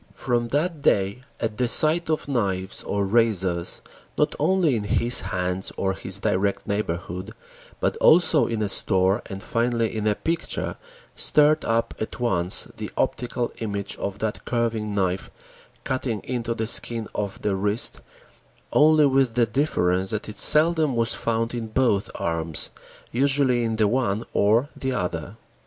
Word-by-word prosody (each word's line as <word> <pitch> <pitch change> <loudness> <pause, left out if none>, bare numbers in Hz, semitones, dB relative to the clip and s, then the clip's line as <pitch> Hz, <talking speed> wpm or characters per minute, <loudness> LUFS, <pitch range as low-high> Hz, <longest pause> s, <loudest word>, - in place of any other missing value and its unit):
From 120 -1 -1
that 155 +4 -1
day 100 -1 +1 0.2
at 110 -2 -3
the 125 0 +1
sight 155 +6 +3
of 155 -2 -1
knives 100 -8 -2
or 100 -1 -2
razors, 95 -5 0 0.3
not - - +1
only 185 -8 +2
in 110 - -2
his 120 +4 +3
hands 90 +1 0
or 95 -1 0
his 95 0 -3
direct 100 -1 -1
neighborhood, 95 0 -4 0.5
but - - -1
also 160 -6 +4
in 110 -2 -2
a - - 0
store 95 +2 +2
and 95 0 -7
finally 115 -1 -1
in 110 -1 -1
a 105 - +2
picture, 165 +8 -3 0.4
stirred 150 +1 +3
up 115 0 0
at 110 - -5
once 95 -7 +3
the - - -5
optical 120 0 -1
image 100 -3 -3
of 100 0 -4
that 110 0 -3
carving 115 -3 -2
knife 95 -1 -1 0.5
cutting 130 -5 -2
into 120 -2 -3
the 110 - -2
skin 115 0 +2
of 100 -2 -4
the 105 -2 0
wrist, 105 +4 -1 0.7
only 155 0 +5
with 135 -4 +2
the 120 -1 +4
difference 95 -7 0
that 110 -1 -3
it 105 - -4
seldom 155 -3 +5
was 115 0 +1
found 115 0 -2
in 115 -2 -4
both 110 -3 +1
arms, 80 -1 +1 0.4
usually 135 -1 +2
in 115 -1 -1
the 110 -1 +2
one 110 -2 0
or 110 +7 +3
the 130 -1 -3
other. 90 -2 -4
115 Hz, 155 wpm, -24 LUFS, 100-125 Hz, 0.7 s, only